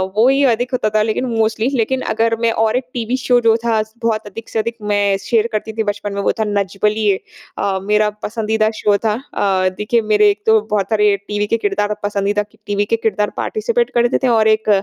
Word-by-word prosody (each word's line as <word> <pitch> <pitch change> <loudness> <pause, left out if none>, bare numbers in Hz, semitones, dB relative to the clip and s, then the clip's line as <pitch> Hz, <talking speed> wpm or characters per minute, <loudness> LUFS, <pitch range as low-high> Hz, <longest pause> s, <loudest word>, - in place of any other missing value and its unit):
वो 225 +3 +4
ही 270 +1 +3
अधिक 245 +3 -4
होता 245 -4 +1
था 215 - +4
लेकिन 220 +4 -1
मोस्टली 220 +2 +1
लेकिन 260 +1 0
अगर 225 +1 +2
मैं 230 - +3
और 220 - +1
एक 260 - -2
टीवी 240 +1 -2
शो 245 -1 +4
जो 225 -1 +4
था 225 -2 +2
स 220 0 -22
बहुत 220 -2 -1
अधिक 225 +3 -9
से 225 - -2
अधिक 230 +1 -3
मैं 205 -1 +1
शेयर 220 +3 0
करती 220 +1 -3
थी 220 0 -1
बचपन 205 -1 -3
में 200 - -2
वो - - +2
था - - +2
नच 200 -2 -2
बलिए। 210 -2 +2 0.4
अ, 195 -1 -1
मेरा 210 +1 +2
पसंदीदा 220 0 0
शो 205 -1 +3
था। 215 - +2 0.2
अ, 190 -2 +1
देखिए 230 +2 +1
मेरे 210 -1 +4
एक 205 +1 -2
तो 220 0 +5
बहुत 205 -2 +1
सारे 210 -2 +3
टीवी 210 0 -1
के 230 - +1
किरदार 205 -1 -1
और 210 - -3
पसंदीदा 205 0 -1 0.3
टीवी 205 0 0
के 230 - +1
किरदार 215 -2 0
पार्टिसिपेट 470 +2 -1
करते 240 +1 +2
थे - - +3
और 225 -3 +3
एक 220 0 +2
215 Hz, 225 wpm, -18 LUFS, 205-230 Hz, 0.4 s, तो